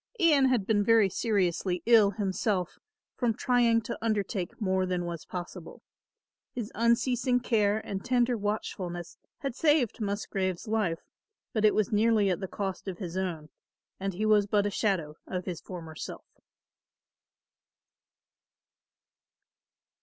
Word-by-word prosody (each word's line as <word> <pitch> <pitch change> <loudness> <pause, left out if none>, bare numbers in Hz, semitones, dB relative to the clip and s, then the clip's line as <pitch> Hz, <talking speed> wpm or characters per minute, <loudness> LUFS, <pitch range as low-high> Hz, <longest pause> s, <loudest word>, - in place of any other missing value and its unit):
Ian 305 -6 +5
had 250 -7 +2
been 205 -1 +2
very 220 -2 +5
seriously 185 -4 0
ill 225 -3 +6
himself 195 -2 -1 0.3
from 235 -3 0
trying 240 -2 +3
to 220 - -6
undertake 205 -4 -2
more 190 -3 +1
than 180 -1 -1
was 170 -2 -5
possible. 180 -1 -8 0.7
His 230 -4 -4
unceasing 245 +2 +2
care 215 -4 +2
and 195 -1 -4
tender 245 -1 +2
watchfulness 180 -5 -4 0.2
had 275 -4 -3
saved 295 -6 +2
Musgrave's 200 -2 -2
life, 210 -7 0 0.5
but 215 - 0
it 210 - +5
was 215 +2 +1
nearly 215 -2 +3
at 180 - -1
the 190 - -4
cost 195 0 -4
of 185 -2 -4
his 180 -4 -6
own 170 -5 -3 0.5
and 195 -1 -3
he 215 +4 -1
was 210 -2 +4
but 205 0 +2
a 205 - 0
shadow 175 -8 -1
of 185 -1 -4
his 175 -3 -5
former 165 -4 -8
self. - - -7
205 Hz, 135 wpm, -29 LUFS, 185-230 Hz, 0.7 s, ill